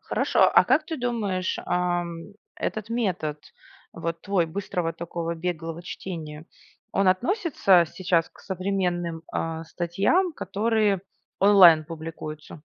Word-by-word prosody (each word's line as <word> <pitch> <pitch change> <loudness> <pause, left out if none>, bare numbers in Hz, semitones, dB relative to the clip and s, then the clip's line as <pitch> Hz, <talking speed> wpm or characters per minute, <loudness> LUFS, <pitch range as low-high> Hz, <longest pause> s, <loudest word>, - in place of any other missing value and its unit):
Хорошо, - - +2
а - - +7
как 310 - +3
ты 320 - -4
думаешь, 215 -7 -2
ам, 175 +1 -2 0.2
этот 215 0 -3
метод, 180 -10 -1 0.5
вот 165 0 -4
твой, 195 -4 +1
быстрого 180 -1 -3
такого, 170 0 -4
беглого 165 -1 -4
чтения, 160 -4 -7 0.5
он 195 -1 +3
относится 220 - +3
сейчас 175 -3 +1
к - - -19
современным, 180 -3 -2
а, 165 0 -3
статьям, 195 - +1
которые 215 - 0 0.4
онлайн 180 -6 +7
публикуются? 155 -1 -8
180 Hz, 115 wpm, -25 LUFS, 165-200 Hz, 0.5 s, а